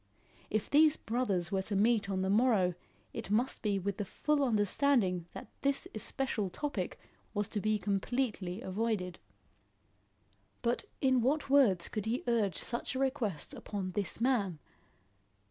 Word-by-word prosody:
If 215 0 -1
these 305 +1 +5
brothers 210 -7 -1
were 195 -1 +1
to 200 +1 -3
meet 215 0 +3
on 190 -1 0
the 190 - 0
morrow, 210 -5 +3 0.4
it - - -6
must 230 +5 +1
be 205 -2 +1
with 195 +1 -2
the 205 - -1
full 295 +8 0
understanding 210 -5 +2
that - - -7 0.2
this 280 0 +1
especial 215 -2 -1
topic 290 - -3 0.4
was 205 0 0
to 210 - -2
be 215 +1 +2
completely 200 0 -1
avoided. 190 -2 -2 1.4
But 240 0 0 0.2
in 260 -2 +4
what 275 +3 0
words 215 -12 +5
could 215 -1 -4
he 240 +3 -1
urge 215 -7 +2
such 235 +2 -2
a - - -1
request 255 - -1
upon 195 -3 -4
this 200 +2 0
man? 230 -9 +1
215 Hz, 145 wpm, -32 LUFS, 195-255 Hz, 1.4 s, these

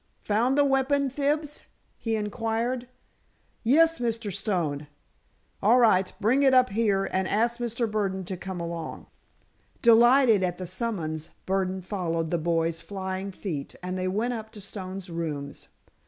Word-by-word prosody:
"Found 235 +6 +2
the 290 - +5
weapon, 270 0 +2
Fibs?" 295 +2 -1 0.3
he 225 -1 -2
inquired. 225 +4 -2 0.8
"Yes, 325 +7 +4
Mr. 230 -4 -2
Stone." 170 -8 -2 0.7
"All 225 +5 +5
right. 195 -6 +4
Bring 245 +7 +3
it 265 -2 +5
up 255 0 +5
here, 200 -2 +1
and 190 0 0
ask 235 +4 +1
Mr. 235 0 -1
Burdon 195 -3 -2
to 185 - -4
come 185 0 -6
along." 170 -1 -5 0.8
Delighted 235 -1 +6
at 180 -1 -1
the 185 - -5
summons, 175 -5 -3 0.2
Burdon 190 -1 -1
followed 165 -4 -2
the 170 - +1
boy's 165 0 0
flying 190 0 -4
feet 170 -7 -5
and 180 0 -3
they 185 0 -1
went 220 +6 0
up 220 -2 -6
to 210 - -9
Stone's 190 -2 -7
rooms. 155 -4 -5
205 Hz, 145 wpm, -27 LUFS, 185-240 Hz, 0.8 s, Delighted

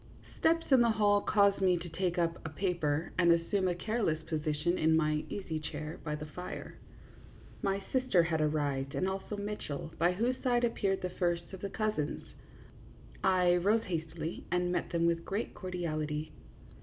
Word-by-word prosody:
Steps 330 +1 +3
in 260 -2 +7
the 235 - +4
hall 205 -2 +3
caused 200 -1 +3
me 185 -2 +4
to 175 +1 -6
take 175 +2 -1
up 170 -1 0
a 160 - -4
paper 160 -2 -1
and 170 -1 +6
assume 175 +3 +2
a 175 - +1
careless 210 -3 0
position 155 +1 -1
in 160 0 +4
my 155 -1 +1
easy 170 -6 -3
chair 155 0 -6
by 150 -1 -2
the 150 0 -6
fire. 180 +4 -7 0.8
My 195 0 0
sister 255 -9 +4
had 160 -1 0
arrived 145 -3 0
and 185 - +1
also 195 +2 -3
Mitchell, 200 -7 -5
by 175 +2 +4
whose 240 +7 0
side 245 -2 +2
appeared 200 -5 0
the 180 - -2
first 175 0 -1
of 190 - -7
the 200 - -3
cousins. 210 -9 -1 1.0
I 180 -2 +4
rose 210 +6 +2
hastily 165 -1 -4
and 180 0 +1
met 180 - -1
them 170 -1 +1
with 170 0 +1
great 205 +6 -3
cordiality. 155 -5 -3
175 Hz, 170 wpm, -32 LUFS, 160-200 Hz, 1.0 s, in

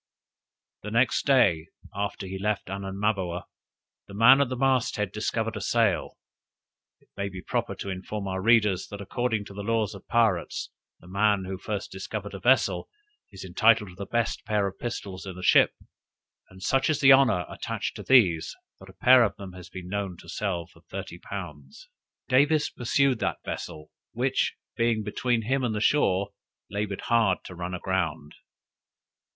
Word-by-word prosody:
The 105 - -6
next 120 +5 +2
day 100 - +4 0.3
after 100 0 -3
he 95 0 -6
left 105 -1 -2
Anamaboa, 95 -2 -2 0.6
the 100 - -10
man 125 +6 +7
at 140 - +1
the 130 - -2
mast 130 -1 +1
head 105 -3 -2
discovered 110 +1 -2
a 105 - -5
sail. 115 -4 +1 0.8
It - - -31
may 100 0 -3
be 95 -1 -9
proper - - -2
to 100 - -5
inform 100 +2 -5
our 95 0 -3
readers, 105 -4 +3
that, 100 - -8
according 110 +1 -2
to 100 - -11
the 100 - -6
laws 110 -1 0
of 100 - -12
pirates, 110 -7 +1 0.3
the 85 - -16
man 100 +1 +2
who 95 0 -5
first 105 -1 -4
discovers 100 +2 -6
a 95 - -6
vessel, 130 +6 +2 0.4
is 95 -1 -9
entitled 105 +3 +3
to - - -15
the 100 +1 -7
best 115 -2 -1
pair 105 -2 0
of 95 -1 -5
pistols 100 -5 -5
in 95 - -6
the 90 - -9
ship, - - +5 0.7
and 95 0 -13
such 135 +6 +2
is 155 - +1
the 140 0 +7
honor 135 -10 +5
attached - - -4
to - - -6
these, 95 -12 +4 0.2
that - - -14
a - - -13
pair 125 -1 +6
of 110 - 0
them 95 -2 -9
has 90 -1 -11
been 95 -1 -8
known 100 -2 -3
to 85 - -15
sell 90 -1 -2
for 85 0 -22
thirty 90 0 -8
pounds. 75 -10 -9 0.4
Davis 145 +4 +3
pursued 130 +1 +1
that 85 -4 -2
vessel, 75 0 -6 0.2
which, 130 +3 0 0.2
being 115 -2 +1
between 115 +2 -1
him 130 +4 0
and 115 -3 -1
the - - -1
shore, 100 -6 +2 0.4
labored 100 -1 -3
hard 115 -6 +2
to - - -9
run 90 +1 -5
aground. 85 -5 -2
100 Hz, 175 wpm, -27 LUFS, 95-115 Hz, 0.8 s, man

